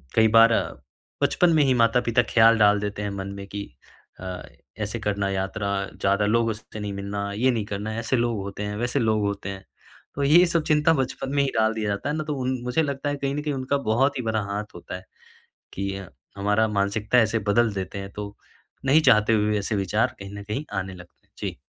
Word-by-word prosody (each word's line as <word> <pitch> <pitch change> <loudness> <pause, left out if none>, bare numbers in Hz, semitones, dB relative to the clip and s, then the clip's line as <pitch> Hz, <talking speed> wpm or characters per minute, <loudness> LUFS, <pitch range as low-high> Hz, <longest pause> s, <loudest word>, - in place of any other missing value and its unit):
कई 110 0 +6
बार 115 +1 +6
अ, - - +1 0.5
बचपन 180 - +3
में 155 -2 +4
ही 135 -2 +3
माता-पिता 115 0 +3
ख़याल 115 0 +6
डाल 105 -1 +5
देते 105 0 -4
हैं 105 - -2
मन 95 -1 -5
में 100 - -7
कि 100 +1 -5 0.6
अ, 90 -1 -6 0.4
ऐसे - - -3
करना 100 -1 -1
यात्रा 100 +1 -2 0.2
ज़्यादा 100 +1 +1
लोग 115 +2 +2
उससे 110 0 -7
नहीं 105 -1 -4
मिलना 100 +1 -4
ये 125 +6 +2
नहीं 115 -4 -2
करना 105 +2 -4
ऐसे 115 +3 0
लोग 120 -2 0
होते 100 +1 -6
हैं, 105 0 -3
वैसे 120 +5 0
लोग 110 -2 +2
होते 100 -1 -3
हैं। 95 -1 -7 0.5
तो 140 - -1
ये 165 +6 +6
सब 170 -2 +1
चिंता 150 +1 +4
बचपन 135 -2 -2
में 140 - +4
ही 135 - 0
डाल 110 0 +3
दिया 110 -2 -2
जाता 100 +7 -2
है 150 - -1
ना, 155 - -2
तो 150 -1 -3
उन 130 0 -1
मुझे 125 +6 +1
लगता 140 0 -2
है 145 - -1
कहीं 140 0 -2
न 150 - -2
कहीं 150 -1 -2
उनका 135 +1 -1
बहुत 135 +5 +2
ही - - -1
बड़ा 110 -1 0
हाथ 105 +1 -4
होता 85 - -7
है 95 +1 -9 0.7
कि 100 0 -3 0.4
हमारा 105 +2 +2
मानसिकता 105 +3 0
ऐसे 115 -1 +3
बदल 115 0 +3
देते 95 +1 -5
हैं। 100 0 -7
तो 105 0 -7 0.5
नहीं 145 +4 +5
चाहते 115 -5 +4
हुए 105 0 +2
ऐसे 105 +2 -2
विचार 105 +6 0
कहीं 100 0 -8
न - - -8
कहीं 105 +9 -4
आने 95 0 -5
लगते 90 -1 -16
हैं। - - -46
जी। - - -4
110 Hz, 225 wpm, -24 LUFS, 100-125 Hz, 0.7 s, कई